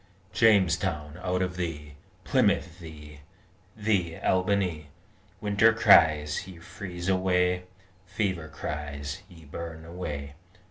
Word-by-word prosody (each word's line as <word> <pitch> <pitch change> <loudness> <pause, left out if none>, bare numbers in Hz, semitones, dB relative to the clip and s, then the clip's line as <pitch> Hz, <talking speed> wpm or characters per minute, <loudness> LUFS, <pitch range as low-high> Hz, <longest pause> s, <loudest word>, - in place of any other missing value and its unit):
Jamestown, 90 -7 +2
out 90 0 0
of 90 -1 -4
thee 75 -4 -4 0.3
Plymouth, 90 0 +1
thee 75 -3 -11 0.6
thee, 100 -6 0
Albany 90 -5 0 0.5
Winter 105 +2 +4
cries, 80 -6 +4
Ye 95 -3 -10
freeze: 90 +1 -7
away! 90 -1 +1 0.4
Fever 95 -4 -2
cries, 75 -1 -5
Ye 80 -3 -15
burn: 80 +2 -7
away! 75 -5 -6
85 Hz, 100 wpm, -27 LUFS, 75-95 Hz, 0.6 s, Winter